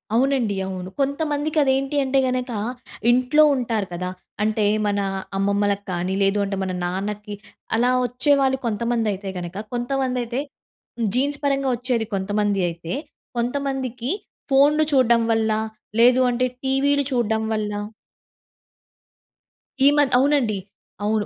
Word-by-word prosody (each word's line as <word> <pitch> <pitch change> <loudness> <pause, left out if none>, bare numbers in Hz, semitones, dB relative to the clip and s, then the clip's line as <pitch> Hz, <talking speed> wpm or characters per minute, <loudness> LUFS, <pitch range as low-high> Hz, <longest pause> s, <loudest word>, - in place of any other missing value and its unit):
అవునండి. 250 -4 +2
అవును. 185 -1 -5
కొంతమందికి 290 +2 -1
అది 265 - +3
ఏంటి 275 +2 -2
అంటే 270 0 +2
గనక 255 0 -2 0.6
ఇంట్లో 255 +5 +4
ఉంటారు 225 -6 -1
కదా! 180 +1 -3 0.3
అంటే 215 0 +1 0.2
మన 205 0 0 0.4
అమ్మమ్మలకి 200 +1 +1
కానీ, 180 +1 -1
లేదు 195 +1 +2
అంటే 195 0 -3
మన 190 - -2
నాన్నకి, 205 +3 -4 0.4
అలా 245 +2 +3
వచ్చేవాళ్ళు 265 +2 +2
కొంతమంది 230 0 0
అయితే 195 0 -6
గనక 175 +1 -6 0.2
కొంతమందైతే 250 -1 -1 0.6
హ్మ్. 230 - +1
జీన్స్ 280 +3 0
పరంగా 275 -1 +1
వచ్చేది 240 -2 -1
కొంతమంది 205 0 0
అయితే, 170 +1 -6 0.4
కొంతమందికి 255 0 -2 0.4
ఫోన్‌లు 290 +3 +5
చూడడం 240 -3 +4
వల్ల, 220 0 +1 0.5
లేదు 250 +2 +6
అంటే 250 +1 +1 0.2
టీవీలు 280 +2 +2
చూడడం 220 -3 +1
వల్ల 215 -1 -1 2.2
ఈ - - +8
మద్ 290 -3 +3
అవునండి. 265 -6 +2 0.5
అవును. 210 0 +1
240 Hz, 120 wpm, -22 LUFS, 205-270 Hz, 2.2 s, ఈ